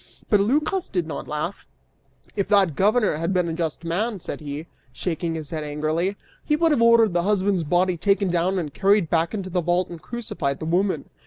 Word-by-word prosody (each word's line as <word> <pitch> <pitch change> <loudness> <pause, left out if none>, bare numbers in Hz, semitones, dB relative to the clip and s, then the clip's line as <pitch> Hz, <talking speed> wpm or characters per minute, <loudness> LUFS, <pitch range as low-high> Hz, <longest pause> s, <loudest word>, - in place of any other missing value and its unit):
But 210 - +6
Lycas 300 - +1
did 180 -4 -1
not 160 - -6
laugh; 150 +6 -4 0.7
"If 200 -2 0
that 195 -7 +3
governor 210 - +2
had 165 +4 -1
been 180 -1 +2
a 165 - -2
just 165 -1 -3
man," 200 +6 -1
said - - -6
he, 145 +1 -6 0.3
shaking 170 -1 -3
his 155 -3 -5
head 155 -2 -3
angrily, 155 +6 -1 0.3
"he 300 - +1
would 330 +1 +2
have 285 - +2
ordered 230 -4 +5
the 175 - +2
husband's 195 -1 +1
body 175 +3 +1
taken 200 +1 +1
down 175 +2 +1
and 155 -6 -3
carried 195 -3 +2
back 165 +4 +1
into 190 -3 -5
the 180 0 +1
vault, 175 +2 +1
and 170 -2 -9
crucified 155 - -3
the - - -5
woman." 175 -2 0
180 Hz, 200 wpm, -23 LUFS, 165-205 Hz, 0.7 s, But